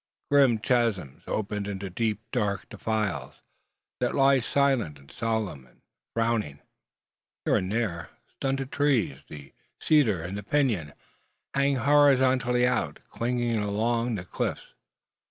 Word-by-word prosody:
Grim 135 -5 +5
chasms 110 - 0
open 105 -1 -2
into 100 -2 -5
deep, 110 +1 -1
dark 100 -6 -1
defiles, 105 - -2 0.6
that - - 0
lie 135 0 +5
silent, 125 - +1
and 70 -1 -17
solemn, 110 - -2
and - - -28 0.3
frowning. 115 -11 0 0.9
Here - - +3
and 95 +1 -2
there, 105 -7 -2 0.2
stunted 135 0 -2
trees, 115 - +1
the 70 -2 -11 0.3
cedar 115 - +3
and 100 +4 -5
pinon, 110 - +1 0.6
hang 140 0 +2
horizontally 130 -2 +4
out, 125 - 0
clinging 120 -1 0
along 115 +3 0
the 90 -3 -5
cliffs. - - -4
115 Hz, 120 wpm, -27 LUFS, 95-130 Hz, 0.9 s, Grim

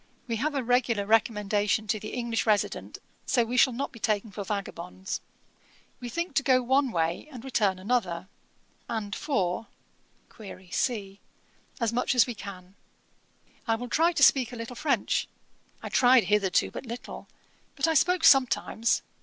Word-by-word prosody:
We 230 -2 -2
have 290 +6 -1
a 270 - 0
regular 235 -4 +1
recommendation 210 -1 +1
to 215 +1 -1
the 215 - -7
English 235 -2 -2
resident, 210 -2 0 0.3
so 240 -3 +2
we 240 +2 -4
shall 255 +1 +5
not 260 +4 -4
be 230 - -13
taken 215 0 -1
for 200 +1 -5
vagabonds. 190 -2 -5 0.8
We 245 - -6
think 340 +5 -3
to - - +4
go 255 -2 +3
one 265 +2 +2
way 165 - -1
and 250 -2 -10
return 205 -8 +1
another, 190 -4 -1 0.6
and 205 -3 -3
for 225 - -1 1.0
[?see] 200 -5 -2 0.6
as 230 -2 0
much 250 +2 0
as 245 - +6
we 245 - -5
can. 190 -2 -10 0.9
I 225 - +2
will 245 +2 -6
try 330 +6 +3
to 280 - +2
speak 260 -3 +5
a - - -7
little 230 +1 -7
French; 280 +3 0 0.6
I - - -5
tried 250 -1 +5
hitherto 195 -1 +1
but 260 - -8
little, 235 +1 -8 0.5
but 275 - +1
I 325 - +2
spoke 360 +3 +2
sometimes. 255 -5 +3
230 Hz, 160 wpm, -27 LUFS, 205-255 Hz, 1.0 s, as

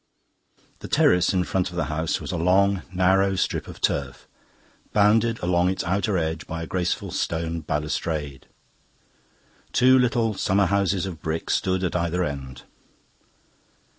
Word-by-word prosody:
The - - -8
terrace 90 0 +3
in 90 -1 +1
front 90 +1 -1
of 90 - -11
the 85 - 0
house 80 +1 -2
was - - -6
a - - -3
long 95 +3 +3
narrow 95 +1 +2
strip - - -1
of - - -10
turf, - - -2 0.7
bounded 110 +3 +3
along 90 0 +2
its 95 - -2
outer 95 +2 0
edge 80 -1 -3
by 80 0 -5
a - - -4
graceful 90 +1 -2
stone 85 0 -2
balustrade. 75 -1 -3 1.3
Two 130 +1 +5
little 120 -3 +1
summer 100 0 +1
houses 100 -1 +1
of 85 -5 -7
brick 80 +1 -3
stood 95 0 0
at 90 - -1
either 90 +1 0
end. 70 -5 -6
90 Hz, 145 wpm, -24 LUFS, 80-100 Hz, 1.3 s, Two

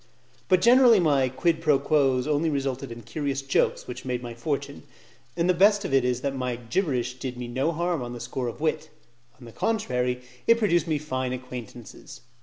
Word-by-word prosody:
But 185 -2 +4
generally 240 -2 +7
my 140 -6 +2
'quid 165 +5 0
pro 150 -3 +4
quos' 135 -3 +2
only 155 +2 +1
resulted 135 -3 -3
in 115 0 -9
curious 140 +3 -3
jokes 135 - +1
which 125 +1 -7
made 125 -1 -3
my 120 -1 -6
fortune; 135 +5 -4 0.6
and 170 +1 +1
the 185 - +4
best 200 +3 +4
of - - -3
it 135 -2 +4
is 125 0 0
that 140 0 -2
my 125 -2 -2
gibberish 125 - -1
did 125 -1 -5
me 125 -1 -5
no 130 +7 0
harm 170 -1 -1
on 120 0 -5
the 120 - -7
score 125 +1 -4
of 120 - -6
wit: 155 0 -1 0.5
on 125 - -14
the 115 - -11
contrary, 125 - -1 0.2
it 230 - +6
procured 175 -7 +2
me 155 -2 +1
fine 130 -4 -3
acquaintances. 125 -1 -9
135 Hz, 200 wpm, -26 LUFS, 125-160 Hz, 0.6 s, generally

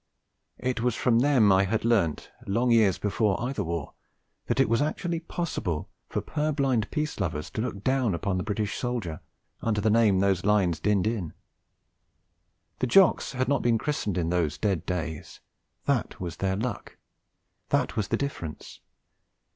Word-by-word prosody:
It 125 -1 -2
was 120 -1 +1
from 120 -2 +3
them 125 -6 +4
I 95 +1 +4
had 110 +3 -1
learnt, 100 -10 +1 0.2
long 120 +5 +1
years 110 -5 +4
before 105 -1 0
either 120 -2 -2
war, 85 -4 -4 0.5
that - - 0
it - - +5
was 115 +4 +2
actually 165 +3 -1
possible 95 - -3 0.2
for - - -2
purblind 140 -7 0
peace 150 -4 -2
lovers 85 -4 -3
to 110 - -2
look 105 -4 -4
down 130 -7 +1
upon 95 +2 -1
the - - -2
British 105 0 -2
soldier, 115 -11 -3 0.4
under 110 -2 0
the 105 +1 +2
name 110 -3 +4
those 95 -2 +2
lines 100 -6 +2
dinned 100 +2 +2
in. 110 -8 -2 1.5
The 130 - +1
Jocks 180 +1 +4
had 130 0 -1
not 140 0 +2
been 115 -1 +3
christened 105 - -2
in 85 -2 0
those 85 -4 0
dead 95 -6 -1
days; 80 -4 -4 0.5
that - - 0
was 85 -3 -5
their 95 -1 0
luck; 120 +5 -4 0.7
that - - +1
was 105 -3 -1
the - - 0
difference. 85 - -5
105 Hz, 165 wpm, -27 LUFS, 95-125 Hz, 1.5 s, it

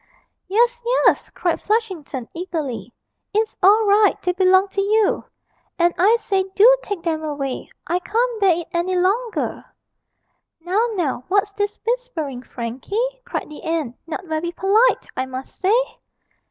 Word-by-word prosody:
'Yes, 480 +5 +2
yes!' - - +2
cried 345 -2 -1
Flushington, 375 - -2
eagerly; 295 - -4 0.4
'it's 435 +1 +1
all 420 +4 +6
right, 410 0 +4
they 360 - +2
belong 375 +1 +4
to 395 - -1
you; 425 +1 +2 0.5
and, 345 -1 +3
I 405 +6 +5
say, 390 -4 0
do 475 +5 +7
take 400 -5 -5
them 320 -2 -1
away; 285 -4 -4 0.2
I 350 - 0
can't 455 +4 -1
bear 355 -4 +4
it 335 - -11
any 350 +2 0
longer!' 415 +6 0 1.0
'Now, 380 +8 +1
now, 305 - -1
what's 405 +2 +1
this 410 +1 -2
whispering, 450 - -2
Frankie?' 245 - -6 0.3
cried - - -4
the 305 - -10
aunt; 315 -7 -2
'not 365 +3 -5
very 320 +1 -2
polite, 405 +7 +3
I 260 - -2
must 260 +1 -7
say!' 450 +7 +1
375 Hz, 145 wpm, -21 LUFS, 320-430 Hz, 1.0 s, do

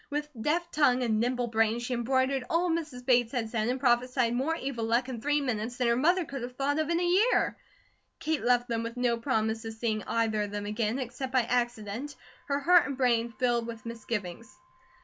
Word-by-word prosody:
With 295 0 -3
deft 340 +6 0
tongue 255 -4 +3
and 220 -3 +1
nimble 245 +1 0
brain, 225 -1 +1
she 240 +1 -3
embroidered 260 +2 +1
all 340 +1 +1
Mrs. 300 -7 -4
Bates 245 -2 +3
had 225 -4 -2
said, 220 -2 0
and 255 +2 -1
prophesied 250 -1 +2
more 270 +7 0
evil 265 -6 -4
luck 235 +3 +1
in 240 -3 -5
three 295 +3 +2
minutes 240 -2 -2
than 250 - +1
her 235 - +3
mother 345 +7 +2
could 275 -2 -6
have 245 +1 -6
thought 285 +3 0
of 310 0 -1
in 340 0 +2
a - - 0
year. 375 +8 +3 0.6
Kate 315 -1 -1
left 245 0 +2
them 230 -2 -1
with 230 +1 -6
no 245 -1 +2
promise 225 -2 -1
of 225 0 -5
seeing 220 -1 -1
either 225 -2 +1
of 205 - -2
them 205 0 -4
again, 215 +3 -1
except 260 0 -5
by 260 -1 +4
accident, 240 +2 -2 0.3
her 280 0 0
heart 355 +3 +5
and 275 -2 -4
brain 235 -3 +2
filled 240 -2 +1
with 230 -1 -8
misgivings. 230 0 -5
245 Hz, 210 wpm, -29 LUFS, 230-275 Hz, 0.6 s, heart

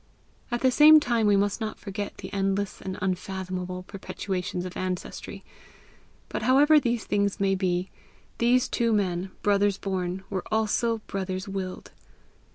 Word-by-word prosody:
At 240 -1 -2
the 260 - +4
same 305 +4 +8
time 235 -6 +1
we 205 -1 +5
must 205 +3 0
not 215 -1 -3
forget 200 0 -6
the - - -8
endless 195 0 -1
and 190 -1 -5
unfathomable 185 -1 -3
perpetuations 185 -2 -4
of 180 - -7
ancestry. 185 -1 -5 0.8
But - - -4
however 285 +6 +6
these 240 -4 -1
things 200 -1 0
may 195 -1 +2
be, 185 -1 -1 0.5
those 245 +2 +3
two 230 -2 +1
men, 190 -3 0
brothers 205 -1 +3
born, 190 -1 -3
were 190 -2 -2
also 220 +1 +1
brothers 190 0 -4
willed. 190 -2 -5
195 Hz, 145 wpm, -26 LUFS, 185-220 Hz, 0.8 s, same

